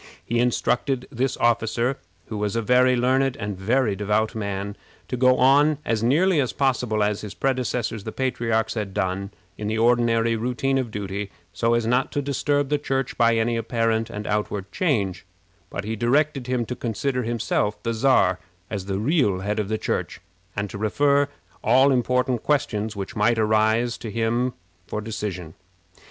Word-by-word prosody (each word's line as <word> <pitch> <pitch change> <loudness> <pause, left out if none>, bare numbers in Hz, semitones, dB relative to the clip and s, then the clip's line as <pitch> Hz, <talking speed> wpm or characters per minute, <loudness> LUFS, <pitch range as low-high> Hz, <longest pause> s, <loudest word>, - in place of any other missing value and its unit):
He 120 +1 0
instructed 125 +2 0
this 130 0 -1
officer, 120 +2 +1 0.3
who 110 - -5
was 105 0 -1
a 115 - +1
very 125 +2 +4
learned 130 +2 +2
and 105 0 -3
a 95 - -13
very 115 0 +2
devout 105 +3 0
man, 100 -2 -4 0.3
to - - -1
go 130 +1 +4
on 145 +3 +5
as 115 -2 0
nearly 155 +7 +3
as 130 - -2
possible 125 -6 +1
as 105 0 0
his 105 -3 -7
predecessors, 125 -5 -1
the 110 - -5
patriarchs, 115 -4 0
had 105 -4 -4
done, 95 0 -1 0.3
in 105 - -3
the 110 +1 -1
ordinary 115 0 +3
routine 125 +4 0
of 125 -3 -2
duty, 100 -1 -4 0.2
so 115 0 +1
as 120 -1 0
not 125 +3 +1
to - - 0
disturb 145 0 0
the 150 0 +1
Church 135 -2 -2
by 115 -1 +4
any 115 +1 +1
apparent 115 -1 0
and 105 +1 -6
outward 105 -2 -2
change; 110 - 0 0.5
but - - -5
he 110 +2 -3
directed 135 +3 +1
him 125 -2 0
to 125 - -4
consider 125 +3 -2
himself, 110 -3 -1
the 115 - -1
Czar, 110 -6 +3 0.3
as 100 -3 -3
the 95 -1 -1
real 110 - +1
head 105 +2 -1
of 105 -2 -2
the 110 - 0
Church, - - -3 0.4
and 100 0 -2
to 100 - -6
refer 140 +6 +2 0.4
all 130 +5 +5
important 125 -1 +1
questions 110 -7 0
which 100 -1 -6
might 115 +3 +2
arise 110 +2 +2
to 115 - -6
him 115 +3 0 0.3
for 105 - -3
decision. 105 -6 -5
115 Hz, 175 wpm, -24 LUFS, 105-130 Hz, 0.5 s, on